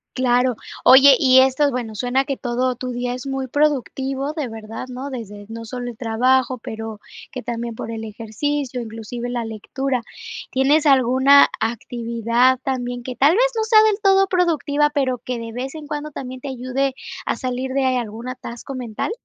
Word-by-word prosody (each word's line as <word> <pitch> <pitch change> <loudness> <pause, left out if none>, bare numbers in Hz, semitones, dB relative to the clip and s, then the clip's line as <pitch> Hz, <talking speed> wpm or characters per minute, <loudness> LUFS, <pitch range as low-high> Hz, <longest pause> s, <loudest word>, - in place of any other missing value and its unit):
Claro. 250 -1 +2 0.3
Oye, 265 +1 +8
y 260 -1 +6
esto, 265 +2 +3
bueno, 240 -3 -4
suena 250 +5 0
que 275 -1 -3
todo 250 +1 -1
tu 255 0 -4
día 245 0 -2
es 250 +2 -6
muy 270 -1 -3
productivo, 275 -1 0
de 305 -4 -3
verdad, 225 +2 -7
¿no? 255 +3 -6
Desde, 210 -5 -8
no 230 0 -7
solo 245 +2 -5
el 230 - -10
trabajo, 255 +2 +2
pero, 220 -2 -7 0.3
que - - -6
también 235 0 -4
por 225 - -6
el 225 -1 -5
ejercicio, 245 +5 -3
inclusive 230 +1 -6
la 240 -1 -2
lectura, 240 +4 -3 0.5
¿tienes 285 +4 +3
alguna 265 +1 +6
actividad 235 +2 +1
también 245 -3 -3
que 250 0 -6
tal 290 +5 +5
vez, 470 - +4
no 440 - +1
sea 435 -1 +6
del 430 -1 +2
todo 390 -1 +4
productiva, 310 -5 +1
pero, 270 -4 0
que 245 +1 -5
de 230 0 -6
vez 255 +5 -5
en 310 -1 -8
cuando 295 0 -5
también 260 -1 -7
te 280 - -8
ayude 260 +1 -2 0.3
a - - 0
salir 255 +1 -3
de 275 -1 +1
algún 230 +1 -5
atasco 255 +1 -7
mental? 245 - -4
255 Hz, 180 wpm, -21 LUFS, 235-275 Hz, 0.5 s, Oye